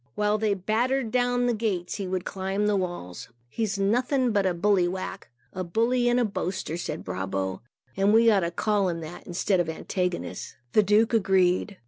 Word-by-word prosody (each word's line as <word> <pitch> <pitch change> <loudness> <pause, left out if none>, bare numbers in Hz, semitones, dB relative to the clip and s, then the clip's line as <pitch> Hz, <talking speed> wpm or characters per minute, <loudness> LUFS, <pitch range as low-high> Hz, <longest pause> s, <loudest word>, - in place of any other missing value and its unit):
While 210 0 +1
they 210 -2 +1
battered 230 +5 0
down 245 0 +1
the 245 - +2
gates, 205 -6 -2
he 195 -2 -4
would 185 0 -2
climb 195 +2 -2
the 210 0 +2
walls. 175 - -4 0.2
"He's 210 - -2
nothing 245 +5 +1
but 200 -3 +2
a 185 - +1
'bulle 180 0 +2
wak'" 185 +1 -6 0.2
(a 185 - -3
bully 235 +7 +1
and 240 +1 +3
a 245 - +2
boaster), 190 -5 -3
said 175 - -5
Brabo, 95 +1 -3 0.3
"and 195 +1 +3
we 225 +1 +6
ought 205 - +4
to 170 -2 -1
call 200 +2 0
him 165 -1 -3
that, 160 +2 -9
instead 185 +2 0
of 170 -2 0
Antigonus." 180 +2 -3 0.2
The 215 - +6
Duke 210 +3 +3
agreed. 190 -1 +2
195 Hz, 185 wpm, -26 LUFS, 180-220 Hz, 0.3 s, we